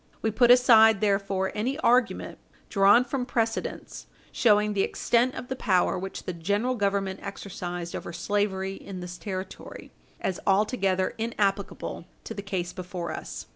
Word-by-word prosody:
We 220 - +1
put 240 +3 +4
aside, 225 -4 +7
therefore, 195 -2 0
any 250 +7 -2
argument, 245 -3 +1 0.3
drawn 205 +4 +5
from 255 0 -2
precedents, 230 -2 -3 0.2
showing 210 -2 +3
the 200 - +1
extent 240 +5 +1
of 245 - -6
the 260 - -3
power 190 -8 +2
which 190 +1 -5
the 185 - -4
General 205 +9 0
Government 200 -3 -1
exercised 175 -3 -6
over - - -6
slavery 195 0 -1
in 195 -1 -8
this 175 0 -8
Territory, 190 -2 -7 0.3
as 185 -2 -2
altogether 195 -2 +1
inapplicable 205 -3 -2 0.2
to - - -6
the 200 - -6
case 190 -3 -3
before 180 -1 -5
us. - - -7
200 Hz, 145 wpm, -26 LUFS, 190-225 Hz, 0.3 s, aside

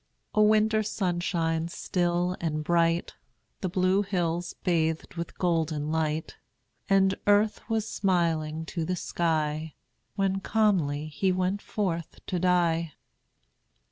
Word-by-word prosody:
] - - -48
A 215 - +3
winter 215 +1 +4
sunshine, 175 -5 -1
still 175 +1 0
and 155 -2 -1
bright, 170 +1 +1 0.5
The 185 - -2
Blue 185 +1 +2
Hills 175 -3 -2
bathed 160 -2 0
with 170 -1 -6
golden 160 -4 0
light, 160 -1 -1 0.5
And 195 -1 +4
earth 205 +1 +3
was 225 -1 0
smiling 165 -6 0
to 165 +1 -3
the 180 +3 -1
sky, 155 -3 -1 0.4
When 195 -1 +1
calmly 185 -9 +1
he 185 +5 0
went 185 +2 0
forth 170 -6 -3
to 180 - -2
die. 170 -3 +2
175 Hz, 120 wpm, -27 LUFS, 160-190 Hz, 0.5 s, winter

